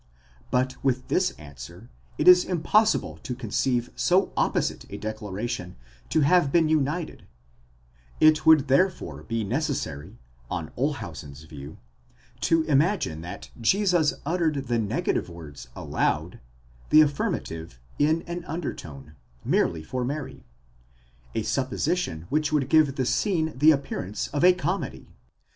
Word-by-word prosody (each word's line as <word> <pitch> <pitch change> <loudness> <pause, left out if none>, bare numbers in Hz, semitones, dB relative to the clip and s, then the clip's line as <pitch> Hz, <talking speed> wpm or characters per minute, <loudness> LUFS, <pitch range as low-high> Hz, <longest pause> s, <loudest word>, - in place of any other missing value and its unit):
But 130 +1 -1
with 130 -1 0
this 185 0 +2
answer, 75 - -12 0.3
it - - 0
is 180 0 +9
impossible 210 +5 +1
to 125 - -5
conceive 120 +1 -1
so 185 +2 +2
opposite - - 0
a - - -6
declaration 110 -3 -5 0.3
to 155 - +2
have 145 0 +4
been 165 0 +4
united; 155 +2 -1 0.9
it 155 0 +5
would 155 -3 +6
therefore 135 - +1
be 115 +8 -3
necessary, 105 - -3 0.3
on 80 -2 -4
Olshausen's 85 - -4
view, 75 -1 -10 0.6
to 165 -1 +2
imagine 150 - +1
that 90 +5 -8
Jesus 180 - +3
uttered 165 -1 +1
the 120 -1 0
negative 105 -3 -1
words 80 -7 -10
aloud, - - -1 0.5
the 155 - +8
affirmative 80 - -2 0.2
in 155 +3 +2
an 175 0 -6
undertone, 80 - -6 0.3
merely 80 -2 +1
for 125 +10 -3
Mary: 140 +2 -5 0.9
a 110 - 0
supposition 130 - -1
which 150 +1 0
would 140 -3 +1
give 155 -4 +4
the 130 - -1
scene 160 - 0
the 150 +5 +5
appearance 135 -9 -1
of 145 +3 -1
a 180 - +8
comedy. 180 +2 -4
135 Hz, 125 wpm, -26 LUFS, 95-160 Hz, 0.9 s, is